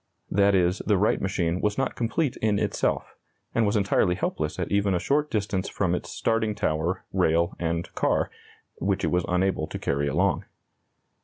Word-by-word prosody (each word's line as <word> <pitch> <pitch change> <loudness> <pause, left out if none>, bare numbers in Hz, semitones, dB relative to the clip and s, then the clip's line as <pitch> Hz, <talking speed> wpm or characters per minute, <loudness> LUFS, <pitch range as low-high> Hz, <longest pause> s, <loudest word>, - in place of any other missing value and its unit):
That 100 0 +4
is, 90 +1 +2
the 105 -2 +1
Wright 105 +4 +2
machine 90 -2 0
was 105 -1 0
not 135 - 0
complete 120 +4 -1
in 105 -2 +1
itself, - - -1 0.4
and 115 -2 +2
was 100 - +1
entirely 100 -3 +2
helpless 75 -3 -2
at - - -3
even 100 -1 +2
a - - +1
short 145 +8 +1
distance 100 -3 -1
from 90 -3 0
its 90 - -3
starting 110 -2 0
tower, 80 +2 -1
rail, 85 -1 +2
and 85 0 -2
car, - - +1 0.5
which 95 +1 0
it - - +1
was 90 -1 +1
unable 90 -3 +1
to - - -5
carry 70 +1 -1
along. 70 - +1
95 Hz, 175 wpm, -26 LUFS, 85-105 Hz, 0.5 s, That